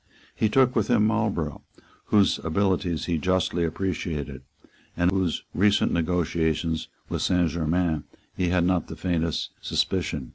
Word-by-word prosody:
He 110 - +1
took 130 +2 +3
with 110 -3 +2
him 105 - +3
Marlborough, 105 -9 -1 0.4
whose 100 -2 +3
abilities 90 0 0
he 85 -3 0
justly 90 0 +1
appreciated, 80 -5 -3 0.6
and 90 +1 +3
of - - -2
whose 90 -4 -1
recent 105 +3 +3
negotiations 80 -1 0 0.2
with - - -3
Saint 90 -3 +2
Germains 85 -1 0 0.3
he 90 - 0
had 90 0 +2
not 90 0 +1
the - - -7
faintest 85 -3 -1
suspicion. 80 -8 -1
90 Hz, 140 wpm, -25 LUFS, 80-95 Hz, 0.6 s, took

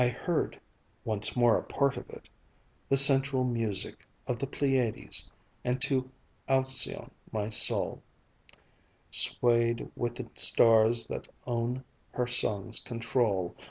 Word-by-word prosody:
I - - +1
heard 165 +6 -4 0.5
once 105 -2 0
more 120 -2 +2
a - - -10
part 140 -2 -2
of - - -11
it - - -14 0.6
The 135 - +3
central 135 -1 +7
music 115 -6 -4 0.2
of 125 - -5
the 135 - -5
Pleiades, 130 -5 0 0.3
And 125 +1 -3
to 130 -2 -2 0.4
Alcyone 130 0 -1 0.2
my 105 -1 -4
soul 110 - +2 1.1
Swayed 120 -1 +3
with 120 0 -5
the 130 -2 -9
stars 115 0 +4
that - - -8 0.2
own 120 +1 -4 0.3
her 125 - -3
song's 115 -3 +1
control. 115 -6 -3
120 Hz, 125 wpm, -27 LUFS, 115-130 Hz, 1.1 s, central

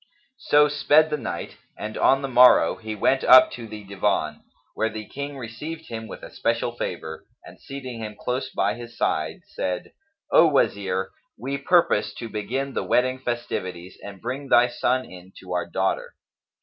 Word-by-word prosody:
So 150 0 +4
sped 150 +2 +3
the 150 - 0
night - - -6 0.2
and 110 +1 -6
on 135 +1 +3
the - - -1
morrow, 125 -1 +6
he 110 -1 -6
went 130 +6 +2
up 130 0 +8
to 115 -2 -8
the 105 -1 -9
Divan, 95 -6 -1 0.3
where 110 - 0
the 110 -1 -7
King 140 0 -6
received 150 +7 -7
him 110 -1 -6
with - - -10
especial - - -1
favour 80 0 -5 0.2
and - - -14
seating 130 -4 -8
him 105 -1 -6
close 125 +2 -2
by - - 0
his 120 0 -10
side, - - -1
said, 90 -1 -4 0.4
"O 165 - +7
Wazir, 95 -9 0 0.3
we 135 +4 -4
purpose 165 - +2
to 115 - -7
begin 130 +6 -3
the - - -1
wedding 130 +1 +1
festivities 95 -8 -4
and 100 -1 -9
bring 130 +5 -5
thy 120 0 +5
son 130 +1 0
in 90 +1 -13
to 90 -1 -7
our 90 -1 -1
daughter." 85 - -2
120 Hz, 170 wpm, -24 LUFS, 105-135 Hz, 0.4 s, up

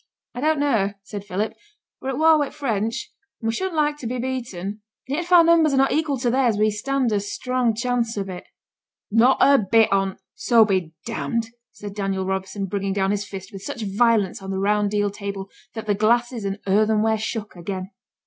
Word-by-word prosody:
'I 245 - -5
don't 310 0 +2
know,' 225 -9 +1
said 200 0 -7
Philip; 205 +3 -2 0.5
'we're 265 - -3
at 265 - -2
war 315 0 +5
wi' 290 - +1
the - - -11
French, 235 - -2 0.3
and 225 - -4
we - - 0
shouldn't 375 +6 -2
like 300 -1 +1
to 255 - -6
be 250 +2 -3
beaten; 240 -8 -4 0.4
and 275 - -1
yet - - -1
if 355 - -13
our 350 -2 +8
numbers 325 -3 +4
are - - +1
not 270 0 +4
equal 305 -3 +1
to 245 -1 0
theirs, 245 -4 +2
we 215 +1 +3
stand 260 +3 -1
a 205 - +2
strong 240 +3 -1
chance 235 -1 -1
of 195 -1 -2
it.' 185 -2 -8 0.6
'Not 235 +5 +5
a 280 0 +6
bit 220 +2 +3
on't 195 -1 0 0.2
so 230 -3 +4
be 195 -3 +2
d 165 -3 -13 0.2
d!' 225 +11 -2 0.2
said 205 -1 -8
Daniel 195 -2 -2
Robson, 190 +1 -3
bringing 195 0 -2
down 195 0 +1
his 205 0 -1
fist 195 +1 -8
with 195 - -8
such 240 -1 -5
violence 205 -1 +2
on 195 - -7
the 190 - -2
round 205 +1 +2
deal 205 0 0
table, 200 -1 -6 0.2
that 220 - -5
the 210 - +2
glasses 235 +2 +1
and 195 0 -2
earthenware 215 +2 +2
shook 215 -1 -4
again. 185 +2 -5
215 Hz, 215 wpm, -23 LUFS, 195-255 Hz, 0.6 s, our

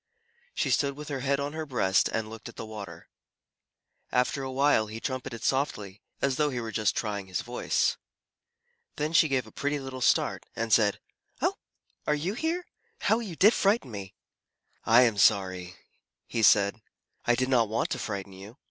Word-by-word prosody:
She - - 0
stood 140 -1 +1
with 150 +1 -8
her 140 -2 -3
head 140 +1 0
on 140 +1 -3
her 160 0 -3
breast 95 -8 +2
and 110 -1 -2
looked 110 +1 -9
at - - -13
the - - -6
water. 110 -2 -9 1.0
After 125 +2 +1
a 135 - -4
while, 135 -5 +3
he 110 +1 -7
trumpeted 130 -2 -4
softly, 105 -8 -1 0.2
as 135 -1 +1
though 150 -1 +2
he 125 -3 -3
were 115 -1 -5
just 110 -2 +1
trying 100 -3 -3
his 95 - -2
voice. 120 +1 0 1.0
Then 150 +2 -2
she 160 - +6
gave 130 -4 0
a 110 - -14
pretty 145 +5 -1
little 130 -1 -7
start, - - +2
and 115 -1 -1
said, 105 -3 +4 0.4
"Oh, - - +1 0.5
are 150 - +3
you 165 +7 -2
here? 330 +8 -2 0.4
How 220 - +3
you 205 -8 -6
did 210 +8 +6
frighten 200 - +1
me!" 100 -3 -7 0.7
"I 115 +2 +7
am 115 -4 +1
sorry," 95 -2 +2 0.5
he 115 - -2
said. 100 0 +4 0.4
"I 120 - +4
did 130 +1 0
not 120 -5 +3
want 110 - -1
to - - -1
frighten 100 -2 -5
you." 100 +6 -12
120 Hz, 185 wpm, -28 LUFS, 105-140 Hz, 1.0 s, I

